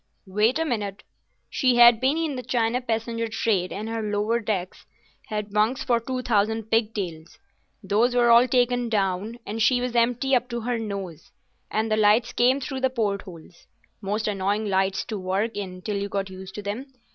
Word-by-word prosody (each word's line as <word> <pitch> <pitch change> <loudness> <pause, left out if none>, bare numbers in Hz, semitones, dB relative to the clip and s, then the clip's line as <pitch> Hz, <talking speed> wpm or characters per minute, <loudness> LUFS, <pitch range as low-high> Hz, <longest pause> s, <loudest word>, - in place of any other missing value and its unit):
"Wait 210 +7 +2
a 325 - 0
minute. 210 -7 -3 0.4
She 255 -3 +1
had 240 -1 +8
been 270 +4 +2
in 320 -4 -1
the 250 - -4
China 245 0 0
passenger 230 -1 -2
trade 210 -4 0
and 210 +3 -5
her 225 0 -3
lower 210 +2 0
decks 195 -5 -4 0.4
had 210 -1 -4
bunks 215 +5 +1
for 240 -3 +2
two 255 +2 -4
thousand 220 -1 0
pigtails. 200 -8 -2 0.5
Those 220 +6 +2
were 240 -1 +4
all 235 +2 +7
taken 245 -1 +1
down, 200 +1 -1
and 220 +2 -4
she 245 +2 +4
was 245 -1 -3
empty 245 +3 +2
up 245 0 0
to 235 -1 -3
her 240 +1 -2
nose, 195 -7 -6 0.4
and 220 +1 -1
the 215 - +2
lights 220 +3 +3
came 255 +3 +3
through 270 0 -4
the 260 - +3
port 210 -6 -1
holes—most 195 +4 -7
annoying 205 +1 -1
lights 190 0 0
to 215 -3 -5
work 195 +5 -1
in 185 -3 -6
till 210 -2 -2
you 200 0 -3
got 195 -1 -3
used 190 0 -10
to 210 - -6
them. 210 +7 -4
220 Hz, 185 wpm, -25 LUFS, 200-240 Hz, 0.5 s, had